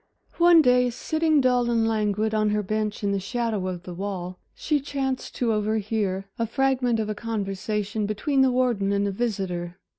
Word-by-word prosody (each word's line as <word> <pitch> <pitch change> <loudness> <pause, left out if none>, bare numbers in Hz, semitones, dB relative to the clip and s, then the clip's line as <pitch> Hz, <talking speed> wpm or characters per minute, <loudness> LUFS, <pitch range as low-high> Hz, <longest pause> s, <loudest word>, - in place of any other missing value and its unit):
One 340 -2 +7
day, 250 -1 +4
sitting 315 +4 +1
dull 250 -2 +2
and 230 -1 +2
languid 215 0 0
on 215 -1 +2
her 210 0 0
bench 215 +1 -2
in 200 - +1
the 200 - 0
shadow 220 -2 -2
of 180 -1 -5
the 180 - -7
wall, 185 -1 -5 0.2
she 300 -2 0
chanced 270 -2 -3
to 235 -3 +1
overhear 210 -2 -1
a 230 - 0
fragment 255 -2 +1
of 215 - -1
a 215 - -2
conversation 210 -1 -3
between 270 +7 0
the 265 - +5
warden 240 -6 +1
and 200 0 +1
a - - -1
visitor. 190 -5 -3
215 Hz, 180 wpm, -25 LUFS, 200-250 Hz, 0.2 s, One